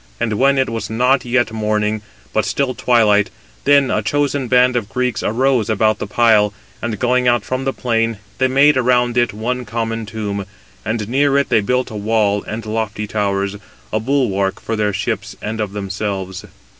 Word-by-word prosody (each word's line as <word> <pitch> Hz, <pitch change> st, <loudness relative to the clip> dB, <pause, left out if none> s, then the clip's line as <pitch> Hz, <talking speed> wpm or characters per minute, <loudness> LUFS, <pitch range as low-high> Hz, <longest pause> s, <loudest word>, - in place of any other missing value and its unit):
And 110 Hz, -, 0 dB
when 140 Hz, +1 st, +4 dB
it 130 Hz, 0 st, +2 dB
was 115 Hz, -1 st, -4 dB
not 125 Hz, +3 st, +2 dB
yet 120 Hz, -1 st, +1 dB
morning, 105 Hz, -1 st, -1 dB, 0.3 s
but 110 Hz, -, +2 dB
still 130 Hz, +7 st, 0 dB
twilight, 110 Hz, -5 st, +3 dB, 0.4 s
then 140 Hz, -1 st, +4 dB
a 105 Hz, -, +1 dB
chosen 140 Hz, +3 st, 0 dB
band 125 Hz, 0 st, +4 dB
of 115 Hz, -4 st, -1 dB
Greeks 125 Hz, 0 st, -1 dB
arose 125 Hz, 0 st, +1 dB
about 110 Hz, 0 st, +2 dB
the -, -, -4 dB
pile; 105 Hz, -2 st, +3 dB, 0.3 s
and 115 Hz, -2 st, -3 dB
going 125 Hz, +2 st, +1 dB
out 120 Hz, -3 st, +2 dB
from 130 Hz, +1 st, -3 dB
the 135 Hz, -, +1 dB
plain, 115 Hz, -3 st, -1 dB, 0.2 s
they 130 Hz, -, +4 dB
made 140 Hz, +2 st, +4 dB
around 125 Hz, -1 st, +2 dB
it 120 Hz, -1 st, +2 dB
one 125 Hz, +4 st, -3 dB
common 115 Hz, 0 st, -3 dB
tomb, 105 Hz, -3 st, -4 dB, 0.4 s
and 110 Hz, -1 st, -2 dB
near 140 Hz, +3 st, +2 dB
it 140 Hz, -, +1 dB
they 110 Hz, -, +3 dB
built 125 Hz, +4 st, 0 dB
a -, -, -7 dB
wall 105 Hz, -1 st, +1 dB
and 110 Hz, 0 st, -5 dB
lofty 110 Hz, -1 st, -3 dB
towers, 100 Hz, -1 st, -1 dB, 0.4 s
a 110 Hz, -, +2 dB
bulwark 110 Hz, -6 st, 0 dB
of 115 Hz, -, 0 dB
their 105 Hz, -1 st, 0 dB
ships 100 Hz, -, -3 dB
and 110 Hz, +1 st, -4 dB
of 105 Hz, -2 st, -2 dB
themselves. 95 Hz, -2 st, -4 dB
115 Hz, 180 wpm, -18 LUFS, 105-125 Hz, 0.4 s, when